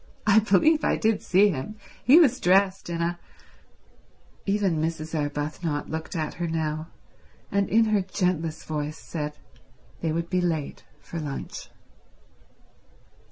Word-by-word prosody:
"I 210 0 +6
believe 235 - +3
I - - +2
did 220 -1 +1
see 195 +3 +4
him—he 215 - +2
was 260 -7 +4
dressed 190 0 +3
in 170 0 -1
a—" 175 +1 -2 1.3
Even 195 -5 +1
Mrs. 160 0 -3
Arbuthnot 150 +1 -2
looked 160 +3 -5
at 155 -2 -2
her 170 - 0
now, 160 -1 -2 0.6
and 200 -1 +1
in 225 +1 +4
her 215 -2 +2
gentlest 180 -4 -2
voice 150 0 -3
said 150 -2 -5 0.6
they 165 - -1
would 165 +1 -2
be 180 -1 +2
late 160 -5 -2 0.2
for 170 - -6
lunch. 145 -3 -6
170 Hz, 130 wpm, -26 LUFS, 155-200 Hz, 1.3 s, I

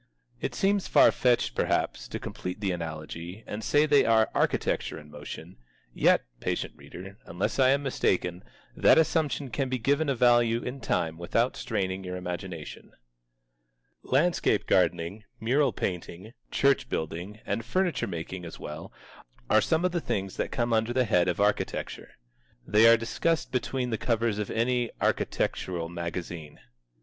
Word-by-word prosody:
It - - -3
seems 195 0 +1
far - - +6
fetched, 125 -2 +2
perhaps, - - 0
to - - -5
complete 90 +2 -6
the 100 -2 0
analogy 85 +3 -6
and 105 +1 -6
say 145 +6 +3
they 145 -2 +5
are 110 -1 +3
architecture - - 0
in 75 -1 -12
motion; - - -9 0.4
yet, - - +3
patient - - -2
reader, 90 +8 -11
unless 90 +9 -2
I 130 -1 +6
am 140 +1 +2
mistaken, 90 -9 0 0.3
that - - +5
assumption 155 -4 +1
can 130 +4 -1
be 130 - 0
given 140 +5 +1
a 135 - +1
value 120 -1 +4
in 125 +2 -5
time 80 -6 -1
without 115 +8 0
straining 95 -5 -2
your 90 0 -5
imagination. 90 -3 -6 1.1
Landscape 165 +7 +2
gardening, 85 +6 +1 0.2
mural 130 +4 +2
painting, 90 +2 -5 0.2
church 135 -2 +2
building, 85 +7 -4
and 115 - -2
furniture 170 - 0
making 90 0 -5
as 85 - -9
well, 75 +3 -7 0.6
are 110 - +6
some 160 - +1
of 180 - +2
the 175 -1 -1
things 95 -7 -3
that - - -1
come 120 -1 0
under 110 +1 +1
the 130 0 +2
head 90 -5 +3
of 90 - -1
architecture. 105 +1 -1 0.5
They 110 +2 +5
are 115 0 +8
discussed 160 +8 -1
between 125 0 -1
the 110 - -1
covers 115 -3 0
of 105 - -3
any 120 +1 +1
architectural 85 -3 -1
magazine. 85 -2 -6
110 Hz, 155 wpm, -28 LUFS, 90-130 Hz, 1.1 s, are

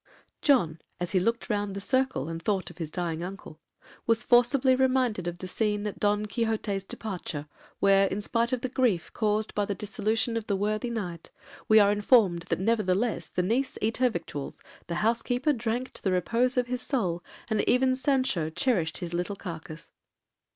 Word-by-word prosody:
John, 170 - +3 0.2
as 175 0 -2
he 190 - +3
looked 230 +5 0
round 205 -2 -1
the - - -3
circle, 260 - 0
and 165 0 -5
thought 195 0 -1
of - - -18
his 160 -3 -3
dying 165 -1 -3
uncle, 180 -4 -8 0.5
was 230 0 +2
forcibly 255 +2 +4
reminded 255 -8 +1
of 175 0 -3
the 185 - -7
scene 210 +1 -1
at 210 - -4
Don 210 0 +2
Quixote's 215 -3 -1
departure, 180 -8 -5 0.3
where, 195 0 +5
in 195 - -2
spite 230 +3 0
of 255 -2 -1
the 255 - -1
grief 240 -9 0
caused 215 -1 0
by 205 - +1
the 200 - -2
dissolution 220 +2 -1
of 225 - -4
the 200 - +1
worthy 215 +4 -1
knight, 180 -8 -5 0.4
we 220 0 +7
are 205 -1 +5
informed 205 -5 +3
that - - 0
'nevertheless 215 +1 +1
the 180 - -1
niece 255 +8 0
eat 220 +2 0
her 255 0 +4
victuals, 160 - -6 0.3
the 170 - -3
housekeeper 245 +5 +1
drank 240 +1 -2
to - - -9
the 190 - 0
repose 235 +8 +1
of 250 - +3
his 250 0 -3
soul, 180 - -1 0.2
and 220 -2 +1
even 255 +1 +3
Sancho 260 - +1
cherished 170 - 0
his 175 -1 -5
little 180 +4 -2
carcase.' 165 -3 -8
210 Hz, 185 wpm, -28 LUFS, 180-240 Hz, 0.5 s, we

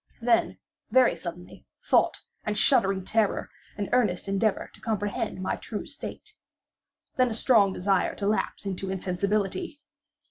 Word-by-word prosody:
Then, 235 -1 +2 0.3
very 255 +2 +5
suddenly, 175 0 -9 0.2
thought, - - +3 0.2
and 210 -1 -2
shuddering 195 -7 +3
terror, 220 -1 0 0.3
and 205 -2 -2
earnest 210 -8 +1
endeavor 195 +2 0
to - - -18
comprehend 205 -4 -2
my 185 - -2
true 210 - -6
state. 285 - -8 0.8
Then 255 -1 +4
a 220 - -3
strong 215 -5 +4
desire 190 0 +1
to 200 - -4
lapse 210 0 -1
into 195 0 -3
insensibility. 200 - -1
205 Hz, 135 wpm, -27 LUFS, 190-230 Hz, 0.8 s, very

